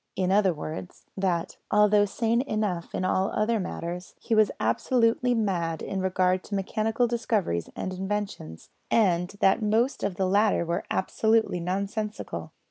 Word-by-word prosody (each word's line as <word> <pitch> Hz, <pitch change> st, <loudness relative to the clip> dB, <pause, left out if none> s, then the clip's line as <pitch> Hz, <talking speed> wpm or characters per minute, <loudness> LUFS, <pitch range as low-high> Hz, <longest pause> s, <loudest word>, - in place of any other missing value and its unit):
In 185 Hz, -1 st, 0 dB
other 195 Hz, -1 st, +4 dB
words, 160 Hz, +3 st, -7 dB
that, 180 Hz, -4 st, -1 dB
although 210 Hz, 0 st, +5 dB
sane 230 Hz, +3 st, 0 dB
enough 210 Hz, -9 st, -2 dB
in 185 Hz, -, -1 dB
all 190 Hz, +1 st, +1 dB
other 220 Hz, +1 st, +1 dB
matters, 180 Hz, -1 st, -5 dB
he -, -, -2 dB
was 215 Hz, -2 st, +5 dB
absolutely 230 Hz, -, +2 dB
mad 175 Hz, -7 st, -1 dB
in 195 Hz, -1 st, -3 dB
regard 185 Hz, 0 st, +1 dB
to 205 Hz, -, -4 dB
mechanical 220 Hz, +4 st, 0 dB
discoveries 215 Hz, -, -1 dB
and 185 Hz, -, -4 dB
inventions, 190 Hz, -, -5 dB, 0.2 s
and 180 Hz, -5 st, +2 dB
that 195 Hz, +3 st, +4 dB
most 225 Hz, +5 st, +1 dB
of 200 Hz, -2 st, -1 dB
the 190 Hz, -, 0 dB
latter 200 Hz, -1 st, +3 dB
were 170 Hz, +3 st, -2 dB
absolutely 220 Hz, 0 st, +1 dB
nonsensical. 195 Hz, -, -3 dB
195 Hz, 145 wpm, -27 LUFS, 180-215 Hz, 0.2 s, although